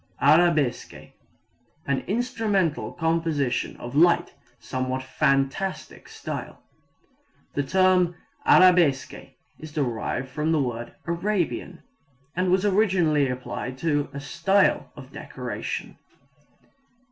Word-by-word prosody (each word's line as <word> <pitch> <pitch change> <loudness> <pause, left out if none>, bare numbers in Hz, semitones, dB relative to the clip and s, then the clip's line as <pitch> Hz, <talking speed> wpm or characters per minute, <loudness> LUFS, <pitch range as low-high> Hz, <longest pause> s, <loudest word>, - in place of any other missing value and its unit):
Arabesque 155 -3 +2 0.7
an 140 -1 0
instrumental 215 - 0
composition 160 -6 -1
in 135 +6 0
light, 175 0 +3 0.3
somewhat 130 0 -3
fantastic 135 +7 -1
style. - - -7 0.9
The 145 - 0
term 180 +3 +3 0.3
arabesque 175 -7 +5 0.5
is 155 -1 -9
derived 130 -2 -2
from 150 +4 -1
the 155 - +2
word 120 -3 -3
Arabian, 175 0 -2 0.5
and 185 +1 +1
was 185 +2 +2
originally 180 -9 +2
applied 125 0 -5
to 145 -2 +1
a 140 - -6
style 195 +7 +1
of - - -12
decoration. - - -6
160 Hz, 95 wpm, -25 LUFS, 135-185 Hz, 0.9 s, arabesque